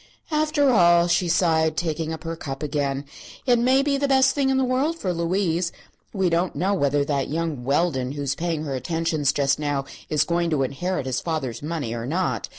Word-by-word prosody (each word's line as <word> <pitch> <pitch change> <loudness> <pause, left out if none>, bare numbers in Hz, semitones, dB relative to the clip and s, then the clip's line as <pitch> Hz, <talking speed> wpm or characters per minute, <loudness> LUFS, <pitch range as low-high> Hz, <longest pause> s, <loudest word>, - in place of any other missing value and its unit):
"After 300 -2 +2
all," 175 -5 +5
she 175 +1 +2
sighed, 160 -2 +2
taking 160 -1 -2
up 160 -1 -6
her 165 0 -4
cup 135 -3 -6
again, 140 -1 -2 0.4
"it 245 -2 +4
may 260 +3 +3
be 280 -1 +1
the 280 0 0
best 265 -1 +4
thing 275 -2 +1
in 265 - +2
the 265 - +2
world 265 +6 0
for 185 - -2
Louise. 170 0 0 0.4
We 190 -3 0
don't 170 +1 0
know 185 +7 +1
whether 145 -5 +1
that 140 -2 -1
young 160 -4 -2
Weldon, 135 -2 0
who 145 -1 -4
is 135 -1 0
paying 165 0 -2
her 140 -3 -4
attentions 155 +2 0
just 140 0 +1
now, 145 -2 -1 0.2
is 150 - +2
going 170 0 0
to 150 -4 +1
inherit 140 +4 -2
his 130 -1 -2
father's 135 -9 -3
money 150 -6 -3
or 120 0 -4
not. 140 - -1
165 Hz, 205 wpm, -24 LUFS, 140-185 Hz, 0.4 s, all